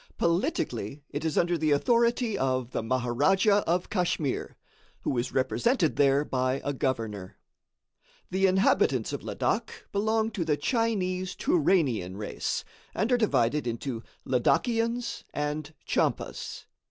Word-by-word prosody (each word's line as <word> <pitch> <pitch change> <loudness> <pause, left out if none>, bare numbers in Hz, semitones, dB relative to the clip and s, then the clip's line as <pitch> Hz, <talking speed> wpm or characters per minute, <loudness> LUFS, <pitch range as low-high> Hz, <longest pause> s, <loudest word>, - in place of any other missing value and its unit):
Politically, 140 - -1
it 145 +1 -4
is 160 -2 -1
under 175 -1 +2
the 155 0 +1
authority 235 - +2
of 130 -6 -1
the - - -1
Maharadja 135 - +2
of 175 +2 0
Kachmyr, 170 - -1 0.5
who - - -1
is 120 +1 -1
represented 135 - +1
there 140 +1 +3
by 130 0 0
a 145 - -1
governor. 110 -8 -3 0.9
The 190 +1 +3
inhabitants 190 +1 +2
of - - -3
Ladak - - -2
belong 220 +2 +1
to 185 - -2
the 155 -2 +1
Chinese 185 - 0
Touranian 150 - +1
race, 105 -1 -3 0.3
and 225 +4 0
are 245 - +5
divided 150 - +2
into 115 0 -3 0.2
Ladakians 230 - +1
and 150 +1 -2
Tchampas. - - -2
155 Hz, 125 wpm, -28 LUFS, 130-200 Hz, 0.9 s, are